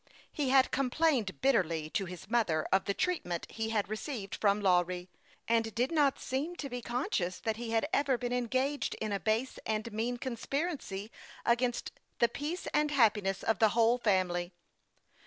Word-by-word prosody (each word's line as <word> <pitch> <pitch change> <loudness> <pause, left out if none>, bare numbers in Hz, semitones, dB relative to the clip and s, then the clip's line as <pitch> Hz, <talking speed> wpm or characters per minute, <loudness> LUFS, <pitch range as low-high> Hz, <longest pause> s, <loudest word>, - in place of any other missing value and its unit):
He 285 -3 -1
had 265 0 +5
com 275 -2 +1
plained 260 - +1
bitterly 170 - +2
to 195 - 0
his 180 0 -9
mother 200 -9 +1
of 190 0 +3
the 200 - 0
treatment 180 - -1
he 225 0 -3
had 210 -2 0
received 215 -1 -5
from 205 -1 +2
Lawry, 180 -2 +1 0.4
and 225 -2 +1
did 250 +5 +1
not 290 -4 +3
seem 285 +7 -3
to 290 - -5
be 245 -1 -4
conscious 235 - -1
that 220 -1 -2
he 235 0 -5
had 225 +5 +1
ever 280 -6 +2
been 245 0 -3
engaged 260 +4 0
in 215 -1 -3
a 200 - 0
base 220 +8 -1
and 220 +1 -2
mean 235 +3 -1
conspiracy 255 - -3 0.3
against 240 +1 +1 0.3
the 235 - +4
peace 305 +9 -4
and 300 0 +3
happi 225 -7 +4
ness 195 -1 -2
of 225 - +1
the 220 - +6
whole 235 +2 +4
family. 185 -5 +1
230 Hz, 175 wpm, -31 LUFS, 200-265 Hz, 0.4 s, the